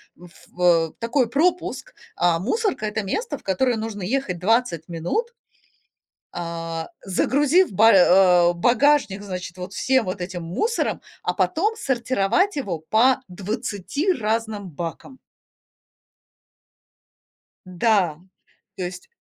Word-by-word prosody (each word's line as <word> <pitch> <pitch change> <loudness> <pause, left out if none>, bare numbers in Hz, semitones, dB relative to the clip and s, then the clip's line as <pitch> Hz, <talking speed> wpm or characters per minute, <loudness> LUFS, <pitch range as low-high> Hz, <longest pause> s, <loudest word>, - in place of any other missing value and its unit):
в 180 - -15
ф 175 - -18
э, 165 -3 +3
такой 235 +1 0
пропуск. 355 - 0 0.2
А 175 -1 +2
мусорка- 380 - -1
это 215 0 -2
место, 440 - -3
в - - -21
которое 240 +6 +1
нужно 220 -3 -5
ехать 200 -4 -2
20 190 -5 +1
минут 175 - -2 1.0
а, 165 -1 -5 0.2
загрузив 290 - +2
ба 220 +4 +5
а, 180 -2 +5
багажник, 240 +1 +2
значит, 185 -2 -6
вот 180 +2 -7
всем 260 0 +1
вот 185 +1 -4
этим 175 -1 -5
мусором, 435 - -1 0.2
а - - -1
потом 420 +8 0
сортировать 260 - 0
его 195 - -3
по 230 +11 +3
20 210 - -2
разным 220 - -2
бакам. 170 - -7 2.5
Да, 185 -3 +1 0.6
то 190 - -5
есть 180 0 -7
205 Hz, 115 wpm, -23 LUFS, 180-260 Hz, 2.5 s, ба